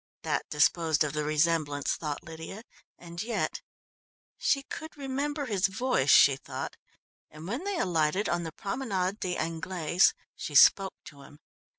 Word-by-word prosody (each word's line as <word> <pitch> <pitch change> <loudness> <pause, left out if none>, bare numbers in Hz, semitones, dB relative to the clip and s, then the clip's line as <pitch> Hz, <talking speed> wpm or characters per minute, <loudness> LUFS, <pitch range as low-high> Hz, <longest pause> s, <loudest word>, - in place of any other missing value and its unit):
That - - -2
disposed 160 +1 +2
of 150 -1 -3
the 150 0 -1
resemblance, 150 -1 +1
thought 150 -3 -5
Lydia, 165 +6 -9 0.3
and 170 0 -8
yet 230 +1 -2 0.7
she 275 -2 +1
could 315 +2 -8
remember 285 +2 -3
his 205 -6 +1
voice, 195 - 0
she 135 -1 +7
thought, - - -6 0.5
and 155 +2 -10
when 245 - -4
they 400 -2 -2
alighted 175 - +1
on 175 0 0
the 165 -1 -5
Promenade 200 - -2
des 180 -1 -2
Anglaise 165 +2 +1 0.2
she 150 - -6
spoke 195 +6 +6
to 140 -2 -12
him. 140 +1 -15
175 Hz, 150 wpm, -29 LUFS, 155-220 Hz, 0.7 s, she